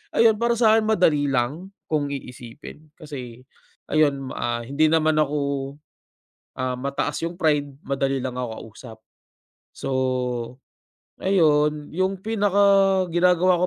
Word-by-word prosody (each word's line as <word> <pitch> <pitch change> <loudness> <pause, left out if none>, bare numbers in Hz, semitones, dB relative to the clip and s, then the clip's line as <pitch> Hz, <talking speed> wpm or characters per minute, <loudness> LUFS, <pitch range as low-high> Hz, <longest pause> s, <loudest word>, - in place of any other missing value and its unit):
ayun 225 -2 +4
para 235 0 +1
sa'kin 220 -1 +3
madali 160 -9 +3
lang, 135 +7 -1 0.2
kung 150 -2 +1
iisipin 135 +2 -9
kasi, 130 -6 -9 0.5
ayun 140 -3 +1
ah 120 0 -3
hindi 140 +6 +1
naman 155 -1 +2
ako, 150 -1 +1 1.2
ah, 130 -1 -2
mataas 140 +2 -3
yung 170 +1 -4
pride, 150 -4 +1 0.2
madali 135 0 -1
lang 130 -1 -4
ako 125 - -3 0.2
kausap. 110 +1 -12 0.8
So, - - -5 1.3
ayun, 150 -5 +2
yung 185 +2 -2
pinaka-ginagawa 190 -4 +3
155 Hz, 110 wpm, -23 LUFS, 135-185 Hz, 1.3 s, ayun